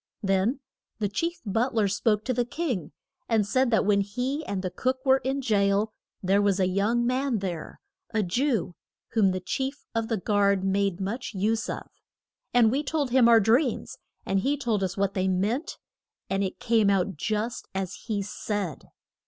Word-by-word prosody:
Then 195 +7 +1 0.4
the 210 -1 0
chief 335 - -2
but 225 +5 0
ler 215 -3 +3
spoke 210 +2 +1
to 255 - 0
the 245 0 +1
king, 240 - -3 0.4
and 220 -3 +3
said 255 +5 +2
that 220 -3 +2
when 200 -1 +3
he 250 +9 -2
and 195 -2 -2
the 185 - -2
cook 255 +8 0
were 265 0 +5
in 265 +1 -2
jail, 205 -1 +2 0.3
there 195 +2 +3
was 200 -1 +2
a 185 - +3
young 210 +6 +1
man 255 0 +1
there, 180 -5 -5 0.3
a 220 -2 0
Jew, 220 - 0 0.4
whom 215 -4 +3
the 185 0 -1
chief 265 +10 -3
of 225 -1 -1
the 225 - 0
guard 200 0 +2
made 195 -1 +1
much 205 +4 -4
use 220 +4 0
of. - - -4 0.7
And 235 -3 +5
we 275 +4 +1
told 295 -3 -1
him 245 -2 +6
our 230 -1 +8
dreams, 235 +4 +1 0.3
and 195 0 +1
he 280 +8 +1
told 235 -7 0
us 190 0 -2
what 200 0 +1
they 190 -1 0
meant. 205 - -1 0.5
And 195 +1 +1
it 190 - -4
came 230 -4 +3
out 195 -1 +1
just 215 +8 -2
as 190 -1 -2
he 205 -3 -1
said. 205 -4 -4
215 Hz, 185 wpm, -27 LUFS, 195-245 Hz, 0.7 s, our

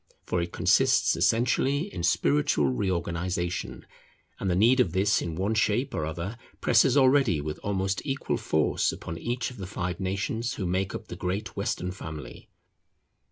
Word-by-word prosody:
For 90 - 0
it 85 0 -4
consists - - +3
essentially 120 - +2
in - - -4
spiritual 75 -3 +2
reorganization; 85 -1 -2 0.5
and 95 - -1
the 90 - +2
need 115 +7 +4
of 95 -10 +2
this 95 +2 +2
in 85 -2 -4
one 95 +5 0
shape 110 +5 +1
or 75 - -2
other 85 +8 -5 0.2
presses 135 0 +4
already 130 - +4
with 75 +1 -5
almost 95 -1 -1
equal 135 -1 -2
force 80 -1 +1
upon 80 +1 -7
each 120 +2 -2
of 125 - -12
the 95 -2 -6
five 90 -2 -4
nations 100 +5 -2
who 95 - -3
make 95 +2 -1
up 110 - -8
the - - -6
great 95 +3 -3
Western 90 +1 -2
family. 80 -7 -9
95 Hz, 160 wpm, -27 LUFS, 85-110 Hz, 0.5 s, need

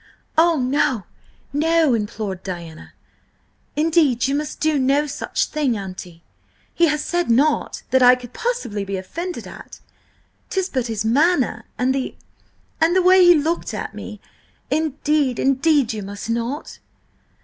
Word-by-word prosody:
"Oh, 330 0 +4
no–no!" 285 - 0
implored 210 -3 -3
Diana. 170 -4 -8 0.8
"Indeed, 300 -6 +2
you 275 - -1
must 295 +1 -3
do 310 -2 +1
no 275 +3 +2
such 285 - -2
thing, 285 -7 -1
Auntie! 185 -3 -8 0.5
He 340 - +3
has 300 -1 -1
said 350 -3 -1
nought 280 +7 +1
that 260 - +4
I 250 0 +8
could 250 -1 -11
possibly 465 - -2
be 195 0 -4
offended 340 - -6
at–'tis 380 -1 -8
but 255 -3 -2
his 220 -2 -3
manner, 260 -3 +2
and 255 +1 +1
the–and 320 +5 -4
the 375 - +4
way 370 +1 +6
he 350 0 +7
looked 320 +3 -1
at - - -5
me. - - -8 0.5
Indeed, 300 -3 0
indeed, 275 -2 +2
you 215 - -5
must 200 +3 -6
not!" 235 +6 -4
275 Hz, 135 wpm, -21 LUFS, 225-320 Hz, 0.8 s, I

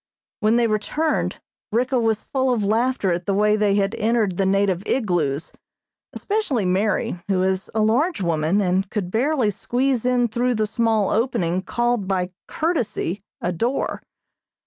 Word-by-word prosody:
When 220 0 +3
they 240 0 +3
returned 230 +9 -1 0.3
Ricka 250 +3 +1
was 225 -2 0
full 260 -1 0
of 230 -4 0
laughter 220 -1 +1
at 170 +1 -4
the 200 - +1
way 210 +1 +3
they 210 -2 +2
had 200 -1 +1
entered 215 -5 0
the 195 - +2
native 195 -2 +2
igloos, 165 - 0 0.6
especially 400 - -1
Mary, 190 0 0
who 190 -2 +1
is 190 0 -1
a 220 - +2
large 270 +11 +2
woman 170 +2 +1
and 190 +1 0
could 200 -5 -3
barely 250 -1 +1
squeeze 245 +5 0
in 245 -1 +2
through 240 +2 0
the 215 0 +1
small 220 -2 +1
opening 185 -6 0
called 240 0 -1
by 185 -1 -1 0.2
courtesy 245 - -2 0.2
a 175 - -1
door. 235 +10 -1
215 Hz, 155 wpm, -22 LUFS, 190-245 Hz, 0.6 s, When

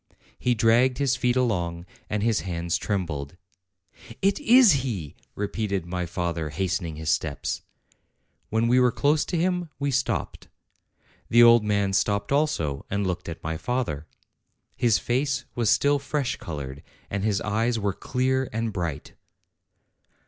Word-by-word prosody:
He 125 -1 +1
dragged 120 +3 +3
his 140 -3 +1
feet 125 -1 +1
along, 90 -9 0 0.2
and 105 -1 -1
his 115 -2 +2
hands 85 -1 -2
trembled. 85 -7 -3 0.8
"It 195 +6 +2
is 250 -5 +7
he!" 100 - -4 0.2
repeated 100 -3 -2
my 90 0 -3
father, 85 -2 -2
hastening 85 0 -2
his 80 0 -1
steps. 75 -3 -2 0.9
When 110 +2 +1
we 125 +2 +4
were 125 -1 +4
close 150 +5 +2
to 175 - -2
him, 180 0 0
we 140 0 -1
stopped. 130 - -2 0.8
The 120 +1 +7
old 115 -1 +7
man 100 -2 +1
stopped 100 +3 0
also 140 - 0
and 100 0 -1
looked 90 -1 -3
at 80 - -8
my 80 0 -3
father. 110 - -2 0.7
His 115 -4 +3
face 130 +1 -1
was 115 -3 0
still 145 +5 +3
fresh 140 -1 -2
colored, 70 -4 -6 0.3
and 100 0 -2
his 105 -3 +1
eyes 115 +3 0
were 100 -2 -1
clear 130 +4 -1
and 115 0 -2
bright. 85 -5 -4
105 Hz, 145 wpm, -25 LUFS, 85-125 Hz, 0.9 s, is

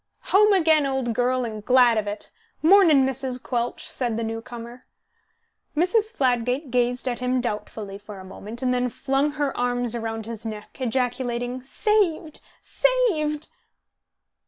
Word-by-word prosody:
"Home 420 +2 +6
again, 320 -6 +4
old 265 -3 -1
girl, 250 +2 +1
and 215 -2 -6
glad 250 -1 +5
of 210 - -4
it! 205 +1 -3 0.3
Mornin', 325 -6 +6
Mrs. 260 -1 -1
Quelch," 245 -1 -3
said 240 -4 -2
the 230 - -2
new 225 0 -3
comer. 235 +1 -9 1.0
Mrs. 420 +6 +2
Fladgate 255 - 0
gazed 245 +1 0
at 245 -2 -2
him 250 0 0
doubtfully 210 -3 -4
for 205 -1 -10
a 190 - -10
moment, 215 +6 -7
and 250 -1 +2
then 250 0 0
flung 275 +4 0
her 290 -2 -1
arms 245 -1 0
round 225 -1 -4
his 230 -1 -6
neck, 215 +3 -8
ejaculating, 245 0 -1
"Saved, 335 - 0 0.2
saved!" 355 -13 +1
250 Hz, 145 wpm, -24 LUFS, 235-290 Hz, 1.0 s, Home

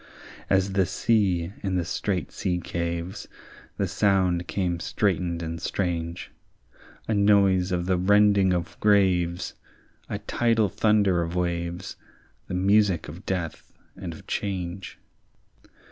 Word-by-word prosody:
As 95 0 +2
the 95 -2 +2
sea 95 -6 +1
in 95 -2 -1
the 90 -2 0
strait 90 -1 -2
sea 90 -2 -1
caves, 85 +1 -4 0.5
The 100 - 0
sound 95 -2 +1
came 90 -3 -1
straitened 85 -2 -1
and 85 +1 -5
strange; 85 -2 -3 0.8
A 110 - +1
noise 100 -3 +4
of 90 -1 0
the 95 0 +1
rending 100 0 +4
of 90 -2 -3
graves, 95 -4 +2 0.6
A - - -2
tidal 115 -3 +1
thunder 100 -4 +2
of 85 +1 -3
waves, 85 +1 -3 0.5
The 90 - -4
music 100 -1 +3
of 85 +6 -11
death 90 -4 -4 0.2
and 95 -3 -6
of 80 - -11
change. 95 -2 -4
90 Hz, 125 wpm, -26 LUFS, 85-100 Hz, 0.8 s, noise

